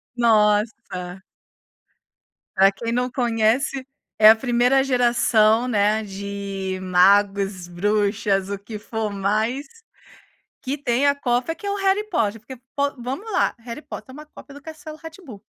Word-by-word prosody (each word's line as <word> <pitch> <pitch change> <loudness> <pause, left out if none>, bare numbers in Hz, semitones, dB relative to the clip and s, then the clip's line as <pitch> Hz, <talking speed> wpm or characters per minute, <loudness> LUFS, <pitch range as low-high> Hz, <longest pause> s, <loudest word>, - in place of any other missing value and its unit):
Nossa. 210 -5 +1 1.3
Para 195 +1 +5
quem 230 +4 -5
não 250 +1 0
conhece, 245 +3 0 0.3
é 215 0 +9
a 220 - +8
1ª 245 +3 +2
geração, 240 -3 +3
né, 215 -1 +1
de 195 -1 -5
magos, 195 0 +2
bruxas, 200 +1 0
o 200 -1 -4
que 210 +1 -8
for 220 0 -4
mais, 215 +8 -1 1.0
que 275 +2 -3
tem 245 +2 +1
a 285 - +4
cópia 255 +2 -1
que 370 +5 -9
é - - 0
o - - -1
Harry 395 +2 0
Potter 225 - -1
porque, 260 +4 -11 0.2
pô, 280 0 +1
vamos 270 - -6
lá, 370 - +1
Harry 235 +5 -8
Potter - - -9
é - - -13
uma 300 +2 -10
cópia 285 -1 -14
do 285 - -12
Castelo 315 0 -10
Rá-Tim-Bum. 320 - -11
225 Hz, 145 wpm, -22 LUFS, 200-270 Hz, 1.3 s, é